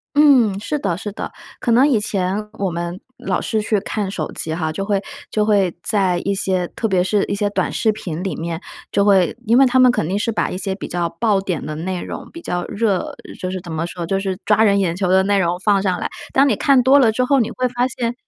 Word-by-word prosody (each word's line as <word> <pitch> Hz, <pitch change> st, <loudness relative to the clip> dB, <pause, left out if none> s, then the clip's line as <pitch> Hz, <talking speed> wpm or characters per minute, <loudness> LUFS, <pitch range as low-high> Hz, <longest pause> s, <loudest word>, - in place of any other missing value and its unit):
嗯， 255 Hz, -9 st, +5 dB
是 295 Hz, +8 st, -2 dB
的 195 Hz, -11 st, -1 dB
是 205 Hz, +2 st, -5 dB
的。 -, -, -6 dB, 0.3 s
可 240 Hz, -, 0 dB
能 255 Hz, +5 st, +5 dB
以 240 Hz, -7 st, +3 dB
前 200 Hz, +1 st, -2 dB
我 195 Hz, -1 st, 0 dB
们 175 Hz, +2 st, -4 dB, 0.2 s
老 -, -, -1 dB
是 220 Hz, -2 st, -1 dB
去 210 Hz, -1 st, +1 dB
看 200 Hz, 0 st, -3 dB
手 -, -, -4 dB
机 160 Hz, -, -3 dB
哈， 160 Hz, -1 st, -2 dB
就 195 Hz, +5 st, -4 dB
会 200 Hz, -1 st, 0 dB, 0.3 s
就 215 Hz, -, +1 dB
会 200 Hz, -5 st, +2 dB
在 190 Hz, -4 st, +1 dB
一 200 Hz, 0 st, 0 dB
些 185 Hz, -2 st, 0 dB
特 225 Hz, -, -1 dB
别 185 Hz, -3 st, +2 dB
是 200 Hz, +2 st, +1 dB
一 -, -, -3 dB
些 205 Hz, 0 st, 0 dB
短 -, -, -1 dB
视 220 Hz, -, +2 dB
频 180 Hz, -6 st, -5 dB
里 195 Hz, -, -2 dB
面， 165 Hz, +1 st, -4 dB, 0.3 s
就 200 Hz, -, +2 dB
会 195 Hz, -3 st, +3 dB
因 230 Hz, +2 st, +5 dB
为 270 Hz, -, +7 dB
它 260 Hz, 0 st, +3 dB
们 255 Hz, -1 st, +7 dB
肯 205 Hz, -10 st, -1 dB
定 195 Hz, +4 st, -1 dB
是 230 Hz, -, 0 dB
把 215 Hz, -, -1 dB
一 -, -, -4 dB
些 190 Hz, 0 st, -3 dB
比 200 Hz, -, -7 dB
较 175 Hz, -1 st, -1 dB
爆 210 Hz, -4 st, +2 dB
点 180 Hz, -5 st, -3 dB
的 155 Hz, -, -4 dB
内 180 Hz, +3 st, -3 dB
容， -, -, -7 dB
比 335 Hz, -, -10 dB
较 175 Hz, 0 st, -2 dB
热 205 Hz, -3 st, -1 dB, 0.2 s
就 185 Hz, -, -3 dB
是 185 Hz, -, -3 dB
怎 175 Hz, -, -9 dB
么 160 Hz, +2 st, -2 dB
说， 175 Hz, -1 st, -5 dB
就 195 Hz, +3 st, 0 dB
是 190 Hz, -2 st, -3 dB
抓 210 Hz, +1 st, +4 dB
人 200 Hz, -2 st, +4 dB
眼 175 Hz, -4 st, 0 dB
球 185 Hz, 0 st, -1 dB
的 190 Hz, +1 st, +4 dB
内 200 Hz, +1 st, +2 dB
容 175 Hz, -1 st, +1 dB
放 200 Hz, 0 st, +2 dB
上 185 Hz, -2 st, 0 dB
来。 -, -, -2 dB, 0.2 s
当 275 Hz, +1 st, +4 dB
你 240 Hz, -, +2 dB
看 265 Hz, +4 st, +3 dB
多 270 Hz, +3 st, +6 dB
了 230 Hz, -4 st, +5 dB
之 255 Hz, +3 st, 0 dB
后， 275 Hz, +2 st, +3 dB
你 230 Hz, -, +1 dB
会 255 Hz, -, -1 dB
发 245 Hz, +1 st, 0 dB
现 235 Hz, -1 st, -3 dB
200 Hz, 280 characters per minute, -20 LUFS, 180-225 Hz, 0.3 s, 为